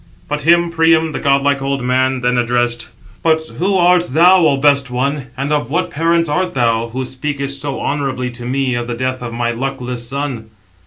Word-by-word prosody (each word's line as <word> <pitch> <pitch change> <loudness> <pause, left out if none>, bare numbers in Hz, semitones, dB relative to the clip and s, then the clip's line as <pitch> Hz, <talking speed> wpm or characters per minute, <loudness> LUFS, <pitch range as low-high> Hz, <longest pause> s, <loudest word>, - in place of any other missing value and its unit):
But 150 0 -2
him 170 +2 +3
Priam, 165 -1 +3
the - - -4
godlike 140 0 +2
old 135 -1 -2
man, 130 +1 +1
then 125 0 +1
answered: 120 -1 0 0.4
"But 160 -1 +3 0.2
who 190 +2 +1
art 180 0 +4
thou, 175 +7 +5
O 140 -2 +2
best 140 -1 +3
one, 135 +2 -2
and 140 +3 -1
of 145 -5 -1
what 175 +5 -1
parents 165 +2 +1
art 180 +3 -1
thou, 115 -2 +1
who 130 +3 -4
speakest 140 +1 -4
so 140 -2 -4
honourably 135 -3 -2
to 120 0 -8
me 130 0 0
of 120 0 -3
the 120 - -3
death 130 +1 -3
of 120 -1 -5
my 120 0 -1
luckless 125 -1 -4
son?" 135 -5 -4
135 Hz, 195 wpm, -17 LUFS, 125-150 Hz, 0.4 s, thou